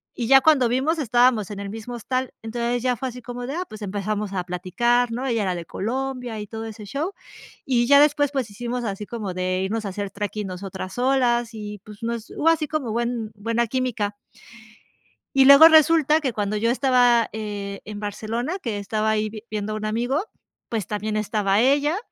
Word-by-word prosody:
y 235 - -3
ya 270 +1 +7
cuando 270 -5 +4
vimos 275 +7 +1
estábamos 240 -5 +3
en 205 -1 -6
el 200 0 -5
mismo 225 +3 -7
hostal, 255 +2 -3
entonces 235 +1 -2
ya 250 -1 +2
fue 260 - -4
así 250 0 -10
como 245 0 -6
de, 275 - -4
ah, 360 - -1
pues, 215 0 -11
empezamos 205 +1 -3
a 185 -2 -1
platicar, 200 +7 0
¿no? 245 +3 -3
Ella 235 -4 0
era 185 -2 -1
de 170 -1 -6
Colombia 250 +3 -3
y 210 - -5
todo 225 +1 -6
ese 220 -1 -8
show, 295 - -3 0.5
y 240 -3 +2
ya 280 +2 +7
después, 290 -1 +3
pues, 260 -6 -2
hicimos 240 +4 -4
así 205 -1 -4
como 210 -5 -5
de 185 0 -1
irnos 215 +3 -2
a 200 - -3
hacer 200 +1 -4
treking 205 +1 -4
nosotras 190 0 -6
solas 245 -2 +2
y, 210 -2 -7
pues, 210 -1 -12
no 230 +1 -1
es, 230 -1 -8
hubo 320 - 0
así 325 -2 +3
como 290 -6 -2
buen 235 -1 -2
buena 230 +3 -1
química. 230 -4 -2 1.2
Y 270 -1 +7
luego 280 +3 +10
resulta 315 -1 +5
que 270 -5 -1
cuando 210 -2 -2
yo 230 +2 +1
estaba, 245 -3 +3
eh, 205 -2 -5
en 210 -1 -7
Barcelona, 225 - -3
que 220 -4 -3
estaba 215 +2 -1
ahí 215 0 -2
viendo 210 0 -3
un 215 0 -4
amigo, 240 +8 0 0.5
pues, 220 -5 -2
también 210 +1 -3
estaba 210 -2 +1
ella, 285 +6 +3
230 Hz, 200 wpm, -23 LUFS, 210-255 Hz, 1.2 s, luego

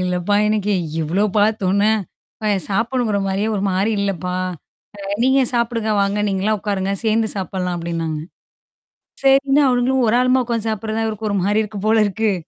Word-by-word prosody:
"இல்லப்பா! 180 +2 0
எனக்கு 210 -1 0 0.3
இவ்ளோ 175 +7 0
பார்த்தோனே, 205 -1 +2 0.5
அப்பா! 215 - -1 0.2
சாப்பிடணுங்கிறமாரியே 210 -3 0
ஒருமாரி 195 +1 0
இல்லப்பா! 180 -3 -2 0.6
அ - - -11 0.2
நீங்க 265 +1 +4
சாப்புடுங்க. 235 -2 0
வாங்க. 200 +1 0
நீங்கலாம் 200 +2 0
உட்காருங்க. 195 -1 -2
சேர்ந்து 220 0 +2
சாப்பிட்லாம்" 180 -1 -3
அப்பிடின்னாங்க. 165 -2 -3 1.0
சரின்னு 275 +1 +4
அவுங்களும் 250 +1 +2
ஒரு 220 +2 +3
ஆளுமா 255 +1 +3
உட்கார்ந்து 230 -2 -2
சாப்பிடுறதான் 220 +1 -2
இருக்கு 215 0 -4
ஒருமாரி 200 +2 +1
இருக்கும் 210 -1 -6
போல 220 0 +4
இருக்கு. 215 +1 0
210 Hz, 135 wpm, -19 LUFS, 195-225 Hz, 1.0 s, நீங்க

